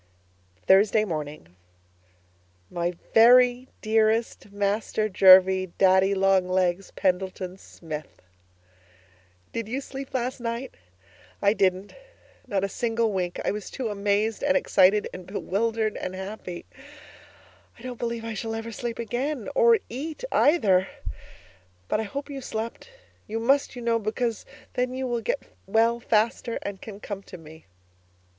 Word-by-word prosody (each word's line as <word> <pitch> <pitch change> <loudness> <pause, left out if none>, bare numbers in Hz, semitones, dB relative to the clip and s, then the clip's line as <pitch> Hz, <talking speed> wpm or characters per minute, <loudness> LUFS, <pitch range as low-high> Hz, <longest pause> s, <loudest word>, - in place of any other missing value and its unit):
Thursday 210 +3 +5
Morning 150 - -6 1.2
My 175 +1 -1 0.2
Very 245 +2 +6 0.2
Dearest 220 -1 +1
Master 205 +2 -1
Jervie 185 -1 +6
Daddy 190 +1 +4
Long 190 -1 +3
Legs 185 0 0
Pendleton 185 -1 -1
Smith, 155 -4 -9 1.3
Did 230 -2 -3
you 250 +5 -2
sleep 275 -1 -8
last 255 +1 -2
night? 235 +2 -4 0.7
I 200 - +3
didn't. 190 -1 0 0.5
Not 200 -5 -1
a - - +1
single 230 +1 -1
wink. 180 -2 -2
I - - +2
was 210 0 -6
too 255 -4 -4
amazed 205 +1 0
and 280 0 +3
excited 200 -5 +3
and 185 -1 -9
bewildered 215 +2 -1
and 185 - -5
happy. 190 -2 -7 1.1
I 230 - -16
don't 250 -2 -7
believe 235 -1 -3
I - - -4
ever 225 - -5
shall 225 +1 -4
sleep 235 +1 -5
again 245 +3 -3
or 470 -2 +5
eat 300 - -6
either. 195 - +4 1.0
But - - 0
I - - -1
hope 280 +8 -5
you 280 -2 -7
slept; 230 - -5 0.4
you 225 +2 -3
must, 270 +4 +2
you 245 - -7
know, 230 0 +2
because 225 +1 -2 0.3
then 250 0 -1
you 260 0 -3
will 240 -2 -1
get - - -2 0.2
well 230 +3 +2
faster 230 +1 0
and 200 -1 -6
can 205 -2 -9
come 205 -2 -6
to 185 - -11
me. 160 - -15
215 Hz, 135 wpm, -26 LUFS, 190-235 Hz, 1.3 s, Very